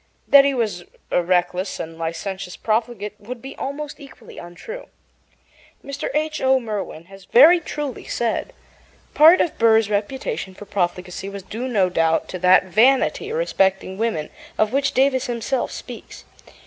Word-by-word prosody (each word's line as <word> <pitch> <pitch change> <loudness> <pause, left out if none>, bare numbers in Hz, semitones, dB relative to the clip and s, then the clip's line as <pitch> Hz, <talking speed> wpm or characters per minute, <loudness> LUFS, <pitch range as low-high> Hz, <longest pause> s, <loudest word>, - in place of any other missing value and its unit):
That 280 -1 +7
he 280 -1 +1
was 210 -8 -2 0.3
a - - +3
reckless 180 +2 0
and 165 0 -6
licentious 180 +3 -5
profligate 220 -2 -2
would 240 +4 -8
be 270 +3 -9
almost 285 +2 -5
equally 280 -2 -13
untrue. 175 - -9 1.0
Mr. 280 0 -4
H. 310 0 -1
O. 265 0 +3
Merwin 210 -8 -5
has 195 0 -15
very 315 +9 +7
truly 295 -5 -6
said: 235 - -2 0.6
Part 320 +4 +7
of 335 - -2
Burr's 225 -2 +4
reputation 210 - -3
for 205 - -11
profligacy 180 0 -3
was 200 -1 -8
due, 230 +6 -5
no 205 -7 +2
doubt, 165 -2 +1
to 185 - -5
that 185 +1 +5
vanity 255 - +2
respecting 195 - 0
women 220 -10 -2 0.3
of 215 +2 +1
which 280 +1 +1
Davis 260 -1 +2
himself 240 +2 -2
speaks. - - -10
220 Hz, 150 wpm, -21 LUFS, 185-270 Hz, 1.0 s, That